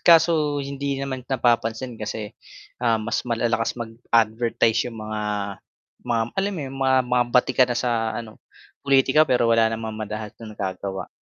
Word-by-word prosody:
kaso 160 Hz, -3 st, +4 dB
hindi 140 Hz, 0 st, -3 dB
naman 135 Hz, -1 st, -3 dB
napapansin 120 Hz, -1 st, 0 dB
kasi, 110 Hz, 0 st, -5 dB, 0.5 s
ah 115 Hz, -2 st, +3 dB
mas 110 Hz, +1 st, -1 dB
malalakas 115 Hz, 0 st, 0 dB
mag 115 Hz, -2 st, -6 dB, 0.2 s
advertise 115 Hz, +1 st, +2 dB
yung 115 Hz, -, -9 dB
mga 110 Hz, 0 st, -4 dB, 0.8 s
ma 120 Hz, -, -1 dB, 0.2 s
alam 195 Hz, +1 st, -1 dB
mo -, -, -4 dB
yung 135 Hz, 0 st, -7 dB
ma 130 Hz, -1 st, +3 dB
mga 125 Hz, 0 st, +2 dB
batikan 125 Hz, +1 st, +3 dB
na 120 Hz, -, -1 dB
sa 115 Hz, -2 st, 0 dB
ano 110 Hz, -2 st, -8 dB, 0.4 s
pulitika 140 Hz, +2 st, +4 dB
pero 125 Hz, -2 st, +3 dB
wala 115 Hz, -1 st, +4 dB
namang 110 Hz, 0 st, -4 dB
madalas 110 Hz, 0 st, -5 dB
na 110 Hz, -2 st, -9 dB
nagagawa. 95 Hz, 0 st, -4 dB
120 Hz, 155 wpm, -23 LUFS, 110-130 Hz, 0.8 s, kaso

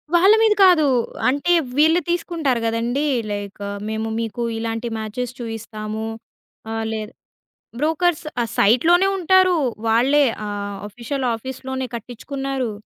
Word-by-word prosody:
వాళ్ళ 385 Hz, +5 st, +6 dB
మీద 435 Hz, -1 st, +5 dB
కాదు. 340 Hz, -5 st, +5 dB, 0.4 s
అంటే 285 Hz, +6 st, 0 dB, 0.3 s
వీళ్ళు 320 Hz, +3 st, +5 dB
తీసుకుంటారు 330 Hz, -7 st, 0 dB
గదండీ! 235 Hz, +6 st, -1 dB, 0.3 s
లైక్, 205 Hz, 0 st, -6 dB, 0.3 s
మేము 220 Hz, 0 st, -2 dB
మీకు 230 Hz, +1 st, -4 dB, 0.2 s
ఇలాంటి 225 Hz, +1 st, -3 dB
మ్యాచెస్ 230 Hz, +3 st, -4 dB
చూయిస్తాము, 220 Hz, -1 st, -5 dB, 0.7 s
ఆహ్, 225 Hz, 0 st, -2 dB
లేదా 215 Hz, +2 st, -5 dB, 0.7 s
బ్రోకర్స్ 320 Hz, +1 st, +1 dB, 0.2 s
ఆ -, -, +2 dB
సైట్‌లోనే 330 Hz, -, +4 dB
ఉంటారు. 370 Hz, 0 st, +4 dB, 0.3 s
వాళ్ళే 265 Hz, +6 st, +4 dB, 0.2 s
ఆహ్, 205 Hz, -1 st, -4 dB
ఆఫీషియల్ 245 Hz, +5 st, -4 dB
ఆఫీస్‌లోనే 260 Hz, +2 st, -5 dB
కట్టిచ్చుకున్నారు. 260 Hz, +1 st, -4 dB
250 Hz, 110 wpm, -21 LUFS, 225-310 Hz, 0.7 s, వాళ్ళ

